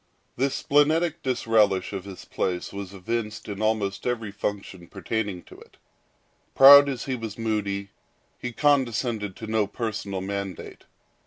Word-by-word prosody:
This 135 +2 0
splenetic 155 +3 +2
disrelish 110 -7 +1
of 95 -1 -5
his 95 -2 -10
place 90 0 -3
was 100 -2 -6
evinced 105 +2 -4
in 100 -1 -6
almost 110 -1 -1
every 115 -4 -2
function 100 -3 -5
pertaining 105 -4 -4
to - - -15
it. - - -18 0.8
Proud 140 +1 +9
as 130 -4 -4
he 135 - -2
was 115 -3 -7
moody, 105 -3 -2 0.5
he 125 - -4
condescended 120 -7 0
to 110 - -8
no 110 -2 0
personal 100 -4 -4
mandate. 100 -1 -6
110 Hz, 140 wpm, -25 LUFS, 100-125 Hz, 0.8 s, Proud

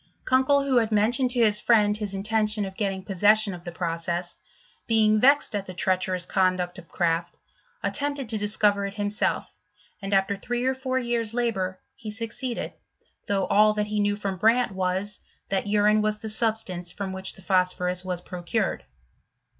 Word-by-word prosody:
Kunkel, 265 +2 +3
who 270 -2 +1
had 225 -2 +2
mentioned 235 +5 +2
to 245 -1 +1
his 210 -1 +3
friend 210 -3 +3
his 210 -2 -2
intention 215 +1 0
of 190 0 -8
getting 195 -2 -2
possession 205 +2 +3
of 175 -1 -9
the 175 - -6
process, 170 +1 -3 0.5
being 215 -2 +3
vexed 280 -1 +4
at 200 -1 -3
the 185 - -8
treacherous 185 -1 0
conduct 185 -1 0
of 170 -3 -15
Kraft, 170 0 -1 0.5
attempted 285 -2 -1
to 220 - -2
discover 205 -1 +2
it 200 - -9
himself, 205 0 -2 0.4
and, 195 0 -5
after 195 0 +2
three 240 +5 -3
or 260 - +2
four 260 0 -2
years 235 -3 -1
labour, 190 -6 -1 0.2
he 220 - -8
succeeded, 230 +3 -4 0.5
though 195 -2 +1
all 210 +1 +4
that 210 0 0
he 210 0 -2
knew 205 0 +1
from 200 -2 -4
Brandt 230 +4 +3
was, 190 +2 -2 0.3
that 195 +1 -1
urine 210 +1 +3
was 215 0 0
the 220 +1 -7
substance 215 -6 -1
from 195 -2 -5
which 190 0 -2
the 190 - -15
phosphorus 180 -1 +1
was 180 -2 -3
procured. 175 -1 -3
205 Hz, 170 wpm, -25 LUFS, 185-225 Hz, 0.5 s, vexed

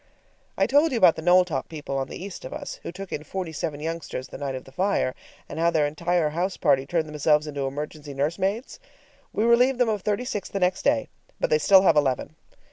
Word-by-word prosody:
I - - +3
told 290 +4 +3
you 250 - 0
about 185 -6 +6
the - - -6
Knowltop 175 -5 +3
people 150 -3 -5
on 135 - -2
the - - -8
east 190 +1 -8
of - - -7
us, 290 -1 -6
who - - -6
took 195 +2 -9
in 150 - -4
forty 180 +2 -5
seven 150 -1 -4
youngsters 160 -4 -5
the - - -8
night 140 -2 -3
of 130 - -6
the 135 - -15
fire, 185 -4 0 0.3
and 155 - -6
how 170 +1 +4
their 160 -3 +2
entire 165 +2 0
house 180 +4 -2
party 135 -4 +2
turned 160 0 0
themselves 150 0 +2
into 140 -2 -3
emergency 145 +1 -6
nursemaids? 190 - -2 0.5
We 215 - 0
relieved 245 +3 +4
them 245 -2 +2
of 210 -2 -1
thirty 210 +5 -1
six 205 -4 -4
the 195 - -3
next 180 0 +1
day, 285 -1 +2 0.3
but - - 0
they 470 - +4
still 195 - +6
have 165 - +5
eleven. 145 +1 0
170 Hz, 225 wpm, -25 LUFS, 150-200 Hz, 0.5 s, about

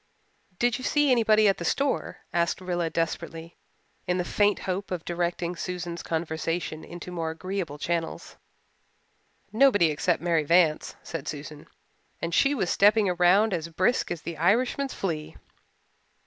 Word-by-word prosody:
"Did 240 +3 +1
you - - -8
see 295 +1 +2
anybody 220 -3 +4
at 195 - +2
the - - -4
store?" 275 +10 -1
asked 170 -1 +1
Rilla 175 -2 -2
desperately, 165 0 -4 0.5
in 180 - +1
the 180 - -1
faint 205 +2 +2
hope 190 +1 -3
of 180 -3 -4
directing 175 0 -2
Susan's 175 -1 -5
conversation 160 0 -3
into 175 +1 -9
more 165 -2 -2
agreeable 175 -2 -4
channels. 165 +1 -3 1.2
"Nobody 215 - +5
except 165 +4 0
Mary 165 -3 +2
Vance," 165 0 +2
said 165 - -6
Susan, 150 0 -7 0.5
"and 165 0 -3
she 275 - +3
was 190 -9 0
stepping 205 -2 +4
round 190 +5 +4
as 165 -2 -2
brisk 185 +9 +1
as 170 -2 -5
the 170 -2 -5
Irishman's 245 - +1
flea." 160 -5 -4
175 Hz, 145 wpm, -26 LUFS, 165-205 Hz, 1.2 s, Nobody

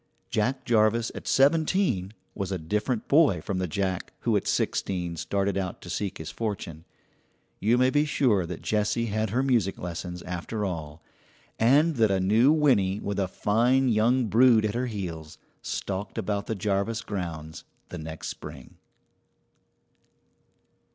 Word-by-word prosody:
Jack 130 +5 0
Jarvis 115 0 +2
at - - -8
seventeen 140 - +2 0.2
was 100 -2 -4
a 95 - -1
different 105 +8 -2
boy 140 - +4
from 95 +3 -3
the 90 - -1
Jack 95 +1 -2
who - - +1
at - - 0
sixteen 90 -3 -1
started 100 +4 -1
out 95 -2 -4
to 85 - -9
seek 100 +1 -3
his 80 - -7
fortune. 95 -7 -5 0.7
You 115 +4 +3
may 130 +1 +3
be 145 +2 +3
sure 115 - +2
that 90 -1 -7
Jessie 110 +2 0
had 110 0 0
her 125 +6 0
music 115 -8 +1
lessons 90 0 -6
after 90 +4 -4
all, 80 -4 -5 0.6
and 145 +7 +4
that 110 -2 +4
a 95 -1 +1
new 110 +9 +4
Winnie 115 -11 +3
with 100 -1 -3
a 95 - +1
fine 120 +7 +2
young 120 +3 +3
brood 115 0 +5
at 105 - -1
her 125 +2 -1
heels 85 -8 -6 0.2
stalked 100 0 -4
about 100 +1 -2
the 110 - -2
Jarvis 105 +3 -1
grounds 85 -7 -6 0.3
the - - -6
next 80 0 -6
spring. - - -10
105 Hz, 150 wpm, -27 LUFS, 90-120 Hz, 0.7 s, brood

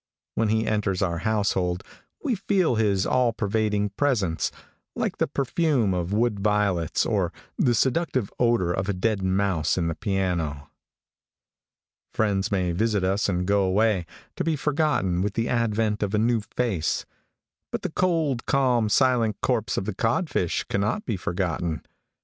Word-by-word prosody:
When 115 -2 +1
he 110 +1 +1
enters 105 -3 0
our 85 -3 -1
household, 95 -3 0 0.4
we 280 -6 +1
feel 195 - +1
his 105 -4 +2
all 125 -2 +2
pervading 105 -1 0
presence, 100 - 0 0.4
like - - -2
the - - +2
perfume 135 - +1
of 90 0 -2
wood 110 0 +1
violets, 100 -5 +1
or - - 0 0.3
the 120 -2 +3
seductive 130 - 0
odor 115 -8 +2
of 95 +2 -2
a - - +2
dead 100 +2 0
mouse 95 -4 +1
in 85 -2 0
the - - -1
piano. 85 -6 -2 1.4
Friends 100 -3 +1
may 90 -3 +1
visit 105 +2 0
us 95 +3 +1
and 90 -1 0
go 100 +1 +3
away, 95 -1 +2 0.3
to - - 0
be 165 -1 +1
forgotten 145 - +1
with 100 +1 -2
the 115 +1 0
advent 110 -2 0
of 105 0 0
a - - +2
new 115 +1 +2 0.2
face; 100 -11 0 0.7
but - - -3
the - - -2
cold, 160 -9 0
calm, 125 -5 +2
silent 120 -3 +3
corpse 115 -4 0
of - - -1
the 110 - -2
codfish 115 - 0
cannot 105 - -1
be 115 - -1
forgotten. 85 -3 -2
105 Hz, 155 wpm, -25 LUFS, 95-120 Hz, 1.4 s, the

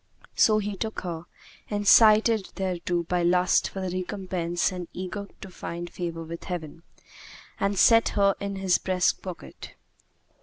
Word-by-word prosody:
So 215 -1 +4
he 205 -1 -2
took 220 +2 -4
her, 170 -2 -5 0.4
incited 215 +1 +5
thereto 180 -2 -2
by 180 +1 -1
lust 180 +1 +3
for 195 - -6
the 185 -1 -3
recompense 185 -2 -2
and 180 -2 -6
eager 190 +3 -5
to 195 - -8
find 175 -1 -6
favour 170 -2 -5
with 165 +1 -8
Heaven, 165 -3 -6 0.8
and 200 0 0
set 230 +4 +5
her 200 -1 +4
in 200 0 -4
his 190 -2 +1
breastpocket. 185 -1 -3
185 Hz, 140 wpm, -26 LUFS, 175-200 Hz, 0.8 s, incited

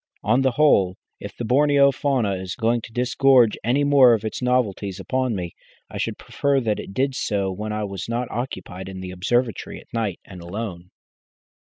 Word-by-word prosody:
On 120 +5 +3
the 130 -2 +2
whole, 100 -11 +3 0.2
if - - -9
the 120 - -4
Borneo 140 +2 +4
fauna 130 -7 0
is 95 -1 -5
going 115 +1 +1
to 115 - -11
disgorge 125 -1 +4
any 130 +5 +2
more 135 -4 +6
of 110 0 -5
its 110 - -4
novelties 105 -6 0
upon 130 +3 -1
me, 90 -3 -5 0.4
I - - -6
should - - -2
prefer 140 -1 0
that 110 -4 -1
it - - -7
did 135 +1 +1
so 100 -6 -1
when 105 +3 -5
I 105 0 -2
was 100 0 -5
not 120 +1 -1
occupied 95 -6 -5
in 95 -1 -7
the 90 -1 -6
observatory 115 +4 -1
at - - -20
night 110 -6 -2
and 90 -3 -11
alone." 90 -1 -6
115 Hz, 190 wpm, -23 LUFS, 95-130 Hz, 0.4 s, more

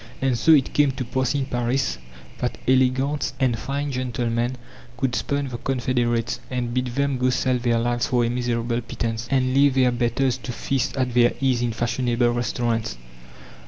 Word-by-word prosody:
And 135 -2 +1
so 160 +8 +5
it 140 -4 +3
came 145 -1 +4
to 130 -1 -4
pass 130 +3 -1
in 140 -2 0
Paris 120 - -1 0.4
that - - -2
élégantes 130 +3 +2
and 125 -4 +1
fine 140 +1 -3
gentlemen 120 -1 -1 0.4
could 130 -1 0
spurn 140 -1 -1
the 120 -1 -6
confederates, 120 -2 0
and 125 -2 -2
bid 125 0 0
them 140 +1 -1
go 130 0 +2
sell 125 0 +1
their 120 -1 +1
lives 120 0 0
for 120 -2 +2
a - - 0
miserable 120 -1 -1
pittance, 115 0 -4
and 130 -2 +1
leave 140 0 +4
their 130 -2 +4
"betters" 120 +2 0
to 120 0 -6
feast 135 +2 -2
at 125 -2 0
their 120 0 +4
ease 130 -3 +1
in 120 -1 0
fashionable 120 +1 0
restaurants. 120 - -1
125 Hz, 175 wpm, -23 LUFS, 120-130 Hz, 0.4 s, so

